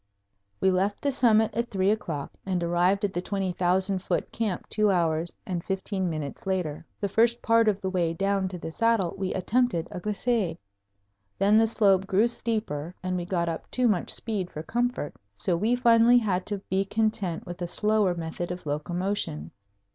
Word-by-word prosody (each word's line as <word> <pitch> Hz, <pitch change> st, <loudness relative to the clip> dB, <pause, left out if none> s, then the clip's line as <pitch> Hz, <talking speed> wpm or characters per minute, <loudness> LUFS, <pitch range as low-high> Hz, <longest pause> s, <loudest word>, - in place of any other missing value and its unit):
We 190 Hz, -, +3 dB
left 195 Hz, +3 st, 0 dB
the 285 Hz, -, +2 dB
summit 220 Hz, -4 st, +3 dB
at 235 Hz, +1 st, -1 dB
three 195 Hz, 0 st, +2 dB
o'clock 165 Hz, -10 st, -3 dB
and 185 Hz, -2 st, -1 dB
arrived 180 Hz, +4 st, +2 dB
at 195 Hz, -, -3 dB
the 175 Hz, -, -1 dB
20,000 190 Hz, 0 st, 0 dB
foot -, -, -2 dB
camp 215 Hz, -6 st, -2 dB
two 215 Hz, -1 st, +2 dB
hours 170 Hz, -2 st, 0 dB
and 175 Hz, -3 st, -3 dB
fifteen 190 Hz, -1 st, -2 dB
minutes 155 Hz, +2 st, -5 dB
later. 180 Hz, -6 st, -2 dB, 0.2 s
The 200 Hz, -, 0 dB
first 235 Hz, +4 st, +3 dB
part 230 Hz, 0 st, +4 dB
of 205 Hz, -2 st, +2 dB
the 190 Hz, -, -1 dB
way 170 Hz, -3 st, 0 dB
down 195 Hz, +1 st, 0 dB
to 185 Hz, -1 st, -6 dB
the 160 Hz, -, -6 dB
saddle 225 Hz, -3 st, +2 dB
we 190 Hz, -1 st, -2 dB
attempted 215 Hz, -2 st, +1 dB
a -, -, -5 dB
glissade. 210 Hz, -2 st, -1 dB, 0.8 s
Then 205 Hz, +2 st, +5 dB
the 225 Hz, -, +4 dB
slope 195 Hz, -4 st, +3 dB
grew 200 Hz, +4 st, +3 dB
steeper 215 Hz, -9 st, -2 dB
and 185 Hz, 0 st, -1 dB
we 175 Hz, -1 st, -2 dB
got 175 Hz, -2 st, -1 dB
up 165 Hz, -1 st, -4 dB
too 250 Hz, -1 st, +1 dB
much 195 Hz, -6 st, 0 dB
speed 200 Hz, -6 st, -2 dB
for 155 Hz, -, -7 dB
comfort, 240 Hz, -4 st, -1 dB, 0.2 s
so 175 Hz, -, 0 dB
we 215 Hz, +8 st, +2 dB
finally 235 Hz, 0 st, +5 dB
had 190 Hz, -6 st, 0 dB
to 205 Hz, -, -2 dB
be 190 Hz, +1 st, +1 dB
content 210 Hz, -4 st, -1 dB
with 175 Hz, 0 st, -8 dB
a 175 Hz, -, -1 dB
slower 210 Hz, -1 st, +2 dB
method 170 Hz, +1 st, -4 dB
of 180 Hz, -1 st, -6 dB
locomotion. 150 Hz, -, -2 dB
190 Hz, 185 wpm, -27 LUFS, 175-215 Hz, 0.8 s, Then